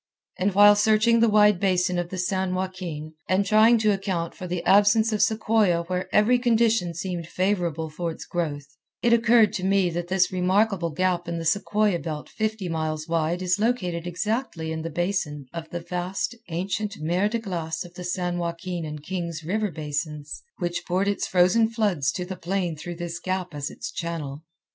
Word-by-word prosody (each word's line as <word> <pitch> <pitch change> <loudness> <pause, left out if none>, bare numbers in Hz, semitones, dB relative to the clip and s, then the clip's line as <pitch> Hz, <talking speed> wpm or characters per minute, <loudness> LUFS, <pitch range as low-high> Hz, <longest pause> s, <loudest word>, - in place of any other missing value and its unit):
And 190 +1 +1
while 205 +1 +8
searching 220 +2 +4
the 230 0 +4
wide 210 -2 +5
basin 180 -2 +1
of 175 -1 -3
the 185 - -5
San 185 0 -1
Joaquin, 180 -5 -5 0.2
and 190 +2 +2
trying 220 +3 +5
to 215 -1 +3
account 190 -4 -2
for 185 - -7
the 175 -1 -3
absence 205 +3 +5
of 210 - 0
sequoia 215 -6 +2
where 180 +1 -3
every 230 +4 +4
condition 225 -7 +2
seemed 175 -1 -4
favorable 175 -4 -1
for 165 +2 -4
its 160 - -7
growth, 150 -5 -3 0.4
it 235 -1 +4
occurred 230 -2 +5
to 185 - -3
me 190 -2 +2
that 175 +1 -3
this 185 0 +2
remarkable 185 0 +1
gap 175 +2 0
in 170 0 -3
the 165 - -4
sequoia 205 +1 +1
belt 155 -3 -6
fifty 215 -3 -2
miles 155 -1 -3
wide 165 +2 0
is 180 +2 +1
located 180 -7 -1
exactly 180 -3 -2
in 160 0 -3
the 165 - -4
basin 165 -4 -2
of 165 -1 -6
the 175 - -5
vast, 180 +5 -3 0.2
ancient 195 +5 -2
mer 175 +6 +1
de 230 - -1
glace 175 -7 -4
of 175 - -13
the 180 - -8
San 180 -1 -2
Joaquin 170 0 -4
and 150 -1 -6
Kings 170 -2 -4
River 210 +6 -1
basins 150 -1 -5 0.2
which 175 0 -2
poured 185 +3 +1
its 205 - -1
frozen 185 +5 +4
floods 200 - 0
to 180 - -3
the 190 +1 -6
plain 180 -1 -2
through 175 +3 -7
this 170 0 -5
gap 185 -2 -3
as 145 +1 -4
its - - -7
channel. 155 -4 -5
180 Hz, 185 wpm, -25 LUFS, 170-205 Hz, 0.4 s, while